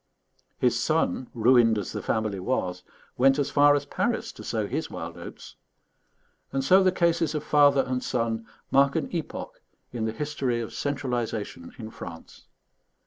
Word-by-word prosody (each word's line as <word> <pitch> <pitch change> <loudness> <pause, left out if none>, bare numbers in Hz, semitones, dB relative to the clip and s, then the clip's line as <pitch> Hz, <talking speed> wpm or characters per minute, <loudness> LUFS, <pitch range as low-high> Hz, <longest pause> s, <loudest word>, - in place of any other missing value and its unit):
His - - +2
son, 120 +8 0
ruined 115 -1 +5
as 100 - -3
the - - -4
family 110 -3 -1
was, 90 -4 -2 0.4
went 135 +2 +5
as 145 -2 0
far 145 0 +6
as 145 0 -1
Paris - - -1
to - - -12
sow - - -1
his - - -3
wild - - -6
oats; - - -10 0.9
and 135 0 -1
so 185 +7 +6
the 185 -1 +4
cases 170 -3 +1
of 150 - -2
father 145 -2 +5
and 125 0 -2
son 115 -2 -1 0.2
mark 140 0 +4
an 160 - -2
epoch 165 -3 -5 0.3
in 115 -2 -2
the 110 - -1
history 135 -2 -2
of 115 - -5
centralization 120 -10 -3
in 110 -3 -8
France. 80 -6 -10
130 Hz, 160 wpm, -26 LUFS, 110-145 Hz, 0.9 s, far